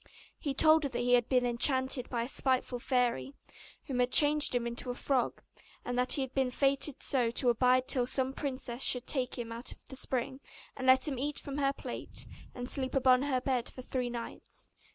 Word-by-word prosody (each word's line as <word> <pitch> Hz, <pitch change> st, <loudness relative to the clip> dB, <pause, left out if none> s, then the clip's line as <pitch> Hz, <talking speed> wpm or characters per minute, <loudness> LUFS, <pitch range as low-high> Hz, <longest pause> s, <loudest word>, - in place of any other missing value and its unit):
He 280 Hz, -2 st, -3 dB
told 315 Hz, +2 st, +6 dB
her 285 Hz, -, -2 dB
that 245 Hz, -, -5 dB
he 245 Hz, 0 st, +1 dB
had 240 Hz, -1 st, +3 dB
been 250 Hz, -2 st, +2 dB
enchanted 260 Hz, +1 st, +2 dB
by 235 Hz, -2 st, -2 dB
a -, -, -5 dB
spiteful 255 Hz, -2 st, 0 dB
fairy, 240 Hz, -, -1 dB, 0.5 s
who 270 Hz, -, -5 dB
had 250 Hz, 0 st, +1 dB
changed 295 Hz, -2 st, +5 dB
him 240 Hz, -1 st, 0 dB
into 235 Hz, +1 st, -4 dB
a 245 Hz, -, -3 dB
frog; 255 Hz, -2 st, -1 dB, 0.4 s
and 245 Hz, -, -3 dB
that 250 Hz, 0 st, +3 dB
he 275 Hz, -, +1 dB
had 265 Hz, 0 st, -8 dB
been 265 Hz, -2 st, 0 dB
fated 275 Hz, +2 st, 0 dB
so 250 Hz, -4 st, +2 dB
to 245 Hz, +2 st, +1 dB
abide 255 Hz, +2 st, +2 dB
till 245 Hz, -2 st, +2 dB
some 265 Hz, 0 st, +1 dB
princess 260 Hz, -3 st, -4 dB
should 250 Hz, -2 st, +3 dB
take 260 Hz, -3 st, 0 dB
him 235 Hz, -2 st, -6 dB
out 235 Hz, +2 st, -5 dB
of -, -, -14 dB
the 265 Hz, -, -9 dB
spring, 260 Hz, 0 st, -3 dB, 0.4 s
and 260 Hz, -1 st, -5 dB
let 260 Hz, +2 st, +5 dB
him 270 Hz, -4 st, -3 dB
eat 290 Hz, +2 st, -3 dB
from 280 Hz, 0 st, -6 dB
her 275 Hz, -1 st, +2 dB
plate, -, -, -6 dB, 0.3 s
and 245 Hz, 0 st, -6 dB
sleep 260 Hz, 0 st, -3 dB
upon 255 Hz, -1 st, +4 dB
her 275 Hz, -2 st, 0 dB
bed 250 Hz, -2 st, -1 dB
for 255 Hz, -, -11 dB
three 250 Hz, -1 st, -3 dB
nights. 235 Hz, -1 st, -8 dB
255 Hz, 215 wpm, -31 LUFS, 245-270 Hz, 0.5 s, told